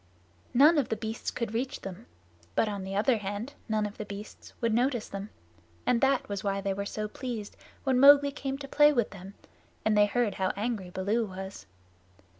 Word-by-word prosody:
None 295 +5 +7
of 270 - -1
the - - 0
beasts 220 +1 -4
could 230 -3 -4
reach 255 +3 -2
them, 195 +5 -8 0.5
but - - +3
on 200 -2 -3
the 190 +1 -5
other 225 +4 +3
hand 205 +6 -4 0.2
none 215 -1 +1
of 205 0 -7
the 210 - -3
beasts 205 +1 -9
would 230 -2 +1
notice 245 0 +1
them, 200 +1 -6 0.6
and 235 - +2
that 270 -1 +2
was 200 -2 -4
why 195 -1 0
they 195 0 -1
were 200 +1 -3
so 215 +1 -3
pleased 225 -2 -6 0.3
when 260 -2 +2
Mowgli 285 +1 +8
came 275 -1 -4
to 275 0 -8
play 295 +2 +6
with 240 -7 0
them, 195 +1 -10 0.5
and 220 -1 +3
they 205 0 +5
heard 235 0 +1
how 190 -1 -1
angry 210 -3 -2
Baloo 205 +5 0
was. 190 0 -8
215 Hz, 200 wpm, -29 LUFS, 200-250 Hz, 0.6 s, Mowgli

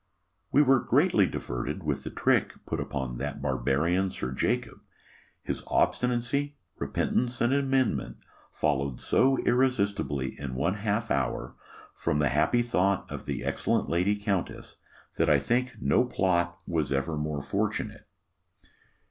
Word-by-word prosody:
We 145 - +6
were 135 -2 +5
greatly 130 - +3
diverted 65 +9 -4
with 75 -3 -2
the - - -4
trick - - +1
put - - -3
upon 65 -3 -4
that 75 0 -4
barbarian 75 +8 +1
Sir 65 -7 -4
Jacob. 65 - -1 0.6
His - - -3
obstinacy, 125 +4 +1 0.2
repentance, 125 0 0
and 120 +3 +2
amendment, 135 - +1 0.3
followed 70 -3 -1
so 135 0 +3
irresistibly 100 - 0
in 65 -3 -5
one 75 +9 +1
half 105 +2 -1
hour, 65 -1 -1 0.4
from 75 - -1
the 75 -2 +2
happy 75 - +2
thought 100 -4 0
of - - -7
the - - -3
excellent - - 0
lady 90 +5 +2
countess, 100 -3 -3 0.4
that - - +2
I 75 - +6
think 125 - 0
no 125 - +3
plot 85 -6 0
was 80 -5 -1
ever 70 +3 0
more 75 -1 -3
fortunate. 70 - -2
90 Hz, 135 wpm, -28 LUFS, -, 0.6 s, We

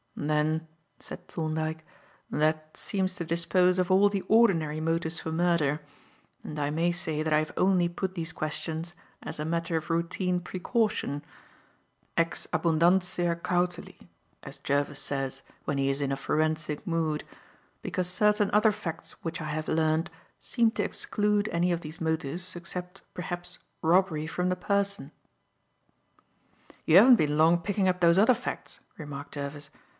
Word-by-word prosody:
"Then," 155 +2 0 0.3
said - - -10
Thorndyke, 160 -1 -3 0.5
"that 155 0 0
seems 190 -2 -1
to 175 -4 -4
dispose 180 +2 +2
of 180 0 +1
all 190 +2 +6
the 200 -1 -1
ordinary 170 -10 +3
motives 165 0 0
for 160 - -5
murder; 160 -3 +2 0.6
and 150 - -6
I 145 0 0
may 165 +3 +1
say 160 -3 -2
that 155 -1 0
I 150 - +5
have 155 - -3
only 185 -2 +3
put 185 +2 -3
these 165 -2 -3
questions 160 +2 -4 0.3
as - - -6
a 150 - -2
matter 165 +1 -1
of 160 - -5
routine 180 +2 0
precaution 185 - -1 0.9
ex 165 0 0
abundantia 175 +1 +2
cautelae, 180 0 -2 0.4
as - - -8
Jervis 145 +1 0
says, 135 -1 -3 0.2
when 140 - -1
he 135 0 +1
is 135 +1 0
in 140 -1 0
a - - +1
forensic 155 +1 -1
mood 160 -3 -1 0.6
because 180 -1 -1
certain 210 +2 +3
other 215 +1 +5
facts 165 -5 -6
which 165 +1 -3
I - - -4
have 155 +1 -3
learned 160 +1 +1 0.3
seem 230 -2 +2
to - - -1
exclude 210 0 0
any 175 +1 +1
of 170 -1 -1
these 155 +2 -9
motives 160 +3 -2
except, 180 +2 -6
perhaps, 175 0 -5 0.2
robbery 165 -2 +2
from 180 +2 -1
the 185 - +1
person." 200 -4 -1 1.7
"You 160 - +6
haven't 245 +5 +9
been 150 -3 +1
long 165 +2 +5
picking 195 +2 0
up 180 0 +1
those 170 +1 +5
other 230 +5 +6
facts," 245 - -6 0.2
remarked 145 -3 -8
Jervis. 145 +1 -6
170 Hz, 150 wpm, -28 LUFS, 155-180 Hz, 1.7 s, haven't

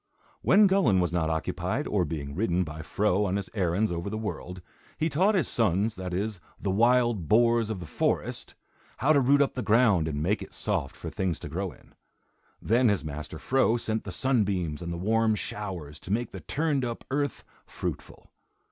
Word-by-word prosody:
When 210 +1 +6
Gullin 185 - +4
was 90 -1 0
not 80 -2 +1
occupied, 80 -1 -2
or - - +1
being 70 -3 -5
ridden 90 0 +1
by 80 -1 -7
Fro 100 +4 +1
on 95 0 0
his 100 -1 -4
errands 95 +1 +1
over 85 +3 -3
the 110 - -3
world, 95 -4 -5 0.4
he 160 - +1
taught 190 +9 +3
his 170 -10 +2
sons, 105 0 +1
that 95 -1 -5
is, 100 +2 -2 0.2
the 95 - -1
wild 120 -3 +3
boars 115 +1 +4
of 110 -4 -3
the 90 - -7
forest, - - -2 0.4
how 150 +4 +3
to 145 - +5
root 140 +2 +5
up 140 - -2
the 130 - -3
ground 105 -6 +3
and 75 -1 -2
make 100 +6 +1
it - - -9
soft 90 -11 -2
for - - -7
things 90 -4 -1
to - - -6
grow 95 +4 -3
in. - - -20 0.7
Then 120 +2 +3
his 100 -7 0
master 75 +1 -6
Fro 130 +3 +2
sent 110 -1 -2
the - - -6
sunbeams 100 - 0
and 85 0 -4
the 85 - -4
warm 110 +4 +2
showers 90 -9 -5
to 90 - -8
make 115 +2 -1
the 95 - -7
turned 145 - 0
up 120 -1 -4
earth 145 +1 -1 0.2
fruitful. - - -6
105 Hz, 195 wpm, -27 LUFS, 85-120 Hz, 0.7 s, When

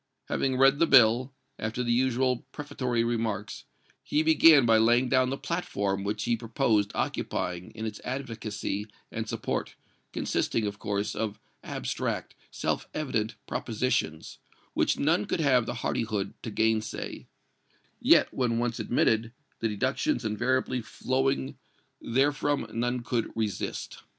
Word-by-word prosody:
Having 130 -1 0
read 135 +2 +5
the 165 - +4
bill, 125 0 +6 0.3
after 110 +3 -2
the 120 - 0
usual 130 +1 +2
prefatory 125 -5 -2
remarks, 110 -3 -2 0.4
he 150 - +1
began 160 -3 +7
by 115 -1 +5
laying 120 +3 +4
down 130 -1 +3
the 135 - -2
platform 100 - -2
which 105 +1 -2
he 120 0 +2
proposed 115 -3 +1
occupying 90 0 -2
in 110 0 -4
its 105 -2 -5
advocacy 110 -5 -4 0.2
and 110 -1 -4
support, - - -3 0.4
consisting, 110 - 0
of 105 0 -4
course, 100 0 -2
of 110 -2 -3 0.2
abstract, - - -3 0.2
self - - -2
evident 115 -7 -1
propositions, 115 -10 -2 0.3
which - - +2
none 165 +8 +2
could 200 - -2
have 130 -6 +3
the 120 - -3
hardihood 105 -3 -1
to - - -5
gainsay, 110 0 -1 0.7
yet, - - +5
when 120 -3 0
once 120 -1 -1
admitted, 115 -1 +1 0.3
the 115 - 0
deductions 130 - 0
inevitably 125 +4 0
flowing 130 +3 -1 0.4
therefrom 145 +2 +1
none 120 +1 -1
could 115 0 -1
resist. 110 -3 -3
120 Hz, 130 wpm, -28 LUFS, 110-130 Hz, 0.7 s, began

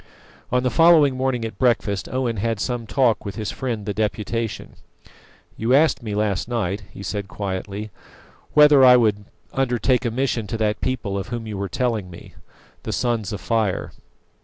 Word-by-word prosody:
On 125 0 +2
the 125 - +1
following 155 -1 +5
morning 130 -3 -1
at 110 - -7
breakfast 110 -6 +1
Owen 125 -3 -1
had 115 +1 -1
some 120 0 -3
talk 125 -4 +2
with 100 -2 -6
his 105 -1 -3
friend 115 -6 -4
the 105 - -2
Deputation. 110 +1 -3 0.8
"You 115 +4 +2
asked 155 -1 +3
me 105 -3 -4
last 105 -1 0
night," 105 -5 -2
he 100 - -10
said 100 -1 -4
quietly, 100 +2 -5 0.6
"whether 150 -2 +7
I 125 -1 +8
would 105 -3 +1 0.3
undertake 125 -1 +1
a 120 - 0
mission 120 -2 -1
to 115 - -3
that 105 -1 -1
people 110 -6 -2
of 95 - -6
whom 120 -2 -5
you 110 -1 -5
were 100 0 -3
telling 110 -3 -1
me 85 - -12 0.5
the - - -5
Sons 115 -4 -1
of 105 - -5
Fire. 110 -5 -1
115 Hz, 175 wpm, -22 LUFS, 105-125 Hz, 0.8 s, I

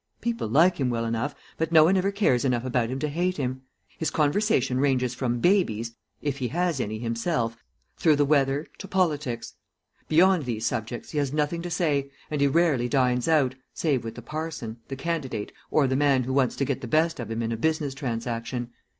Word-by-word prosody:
People 235 - -2
like 165 +11 +4
him 130 -2 +1
well 115 -1 -1
enough, 115 +5 -2 0.2
but 160 0 0
no 160 -2 +8
one 180 +5 +4
ever 190 +1 +2
cares 195 - +2
enough 125 -2 0
about 120 -2 0
him 130 - -2
to 150 - -1
hate 175 +5 -1
him. 130 -2 -2 0.4
His 160 - 0
conversation 145 - +1
ranges 130 -3 +1
from 120 -2 -1
babies 115 - +1 0.3
if 145 -1 -2
he 125 - -1
has 175 0 0
any 110 -2 -2
himself 115 0 -2 0.3
through 155 -3 +4
the 145 0 +3
weather 140 0 +2
to 195 - -7
politics. 150 - -1 0.5
Beyond 175 0 +4
these 115 -2 -2
subjects 115 +1 -3
he 150 - -1
has 140 -2 0
nothing 150 +3 0
to 175 - -5
say, 145 -5 0 0.2
and 150 -2 -1
he 140 - +5
rarely 140 -5 +2
dines 125 -2 +2
out, 145 -6 +3 0.2
save 145 -6 0
with 115 - -6
the 120 - -9
parson, 150 -7 -5
the 135 - -5
candidate, 135 -8 -3 0.2
or 150 - +3
the 130 0 +1
man 135 -2 +3
who 130 +2 -3
wants 130 -2 +2
to 140 - 0
get 140 -2 -2
the 125 - -5
best 160 +4 +2
of 120 - -5
him 115 +1 -2
in 115 - -2
a - - 0
business 150 +2 0
transaction. 120 -1 -3
135 Hz, 205 wpm, -26 LUFS, 120-160 Hz, 0.5 s, no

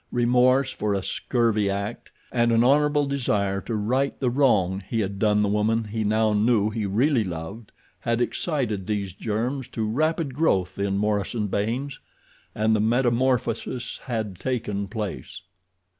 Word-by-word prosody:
Remorse 125 +2 +3
for 105 -1 -1
a 95 - -2
scurvy 110 -4 0
act, 100 +1 -4 0.2
and 120 -1 +2
an 115 0 +4
honorable 145 +2 +3
desire 105 -8 0
to 115 - -4
right 130 +6 0
the 125 -3 +1
wrong 105 -9 +2
he 115 - 0
had 100 -1 -3
done 105 -1 +3
the - - +2
woman 105 +2 +1
he 110 +1 -3
now 110 +1 +2
knew 105 0 +2
he 105 -2 -2
really 120 +5 +2
loved 90 +5 -7 0.3
had 115 0 -1
excited 120 - -1
these 100 -4 -2
germs 115 +7 -2
to 110 -2 -3
rapid 155 +4 0
growth 95 - 0
in 100 0 0
Morison 105 +1 0
Baynes—and 110 0 -3
the - - +1
metamorphosis 120 +1 0
had 110 -7 -3
taken 105 -6 -2
place. 105 0 -6
110 Hz, 145 wpm, -25 LUFS, 105-125 Hz, 0.3 s, an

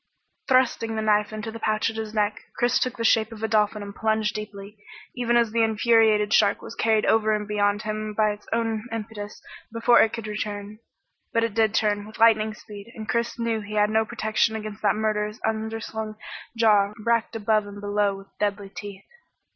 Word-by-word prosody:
Thrusting 255 -4 +2
the 220 - -2
knife 210 0 +2
into 215 +1 -5
the 230 - -8
pouch 215 +1 0
at - - -13
his 220 -1 -4
neck, 210 -1 -1
Chris 240 +1 +2
took 255 -1 -2
the 230 - -3
shape 220 0 +3
of 225 -1 -9
a - - +1
dolphin 210 -1 +1
and 200 0 -8
plunged 220 -1 0
deeply, 210 -1 -8 0.4
even 240 -1 +1
as 235 -2 +2
the 230 +1 +1
infuriated 220 -1 +3
shark 205 -2 +4
was - - -9
carried 220 -2 +2
over 215 -1 +3
and 210 -1 -4
beyond 205 0 +1
him 215 0 -4
by 215 -1 +3
its 210 0 -10
own 225 0 -1
impetus 215 -2 -6 0.3
before 230 +1 +5
it 220 - +3
could 230 -2 -5
turn. 205 0 -6 0.5
But 230 - +3
turn - - -18
it 220 -1 +2 0.2
did, 205 - -10
with 215 - -12
lightning 220 -1 +4
speed, 210 +1 -11
and 215 -1 -7
Chris 235 0 -1
knew 230 -2 -1
he 210 +1 -7
had 210 0 +3
no 220 0 +3
protection 220 +1 0
against 215 -1 -6
that - - +2
murderous 215 0 -1
underslung 220 0 -3 0.4
jaw 210 -3 +4
racked 230 0 +1
above 215 -1 +1
and 205 0 -9
below 205 0 0
with 195 0 -14
deadly 200 -1 -1
teeth. 200 0 -9
215 Hz, 195 wpm, -25 LUFS, 210-225 Hz, 0.5 s, before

